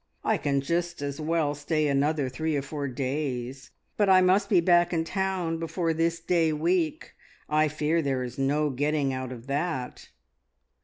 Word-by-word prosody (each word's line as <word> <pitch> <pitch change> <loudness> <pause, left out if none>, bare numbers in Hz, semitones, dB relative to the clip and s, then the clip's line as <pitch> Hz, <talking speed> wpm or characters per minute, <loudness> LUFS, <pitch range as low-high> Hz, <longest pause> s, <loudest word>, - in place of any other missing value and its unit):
I - - +2
can 140 -1 0
just 170 +1 -2
as 140 +1 -4
well 155 -2 0
stay 150 +1 -1
another 145 0 +1
three 155 +4 -2
or 140 - -2
four 145 0 -4
days, 130 -1 -3 0.3
but 205 -2 +3
I 190 -1 +7
must 190 +2 +3
be 190 - +5
back 175 0 +4
in 165 -2 0
town 185 -2 -2
before 165 0 -1
this 165 +1 0
day 165 -1 +1
week. 160 +1 -1 0.3
I 155 +1 +3
fear 155 +2 0
there 135 -3 -1
is 125 +1 -7
no 145 +2 +1
getting 145 +1 0
out 130 -1 -4
of 120 -2 -9
that." 140 -2 -3
155 Hz, 170 wpm, -27 LUFS, 140-170 Hz, 0.3 s, I